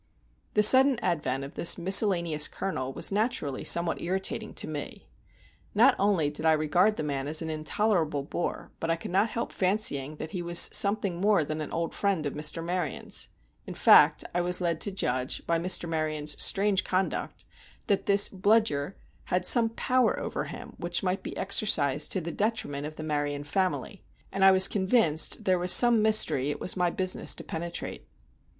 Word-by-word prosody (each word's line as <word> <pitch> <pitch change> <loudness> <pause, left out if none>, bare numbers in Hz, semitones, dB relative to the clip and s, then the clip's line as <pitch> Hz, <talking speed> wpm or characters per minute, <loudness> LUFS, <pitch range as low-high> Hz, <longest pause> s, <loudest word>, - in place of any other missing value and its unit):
The 210 - +3
sudden 260 +4 +8
advent 140 -6 -3
of 140 - -10
this 170 - +5
miscellaneous 170 -4 +2
colonel 135 -9 -5
was - - -1
naturally 205 - -3
somewhat 170 -1 +3
irritating 190 +2 -4
to - - -1
me. - - -8 0.7
Not 245 +5 +4
only 190 -7 0
did 150 +1 -4
I 160 0 +3
regard 175 +7 +1
the - - -5
man 140 -2 -4
as 155 +2 -2
an 160 - -5
intolerable 155 -1 -2
bore, 170 +4 -6
but 165 - -5
I 165 - +1
could 165 - -9
not 200 +5 +1
help 235 - -6
fancying 180 -8 -1
that 155 +1 -9
he 180 - -5
was 170 0 +4
something 200 -3 +1
more 200 -4 +2
than 155 +1 -6
an 150 - -7
old 165 0 -4
friend 195 -6 -2
of 145 - -4
Mr. 150 +2 -2
Maryon's; 175 -4 -4 0.4
in - - -8
fact, - - +4
I 175 - -1
was 180 0 0
led 170 -2 -3
to 200 - +2
judge, 130 -8 -3
by 170 0 -1
Mr. 175 0 0
Maryon's 155 -2 -3
strange 200 -1 +1
conduct, 185 +1 -4 0.4
that 200 -4 -2
this 200 0 +6
Bludyer 195 -6 -1 0.3
had 180 0 -2
some 230 +2 +4
power 250 +2 -1
over - - -5
him - - -10
which 175 +2 -2
might 185 0 -2
be - - -9
exercised 150 -8 +2
to 190 - -2
the 170 +1 -6
detriment 165 -10 -4
of 155 - -11
the 155 - -9
Maryon 145 -2 -4
family, 185 +4 -4 0.3
and 195 - -2
I 195 - +7
was 190 0 +6
convinced 190 -6 0
there 185 -1 +1
was 180 0 +1
some 240 -2 +7
mystery 215 -11 +3
it 145 - -5
was - - -1
my 180 -1 0
business 185 +1 0
to - - -9
penetrate. 170 +1 -7
175 Hz, 185 wpm, -26 LUFS, 155-200 Hz, 0.7 s, sudden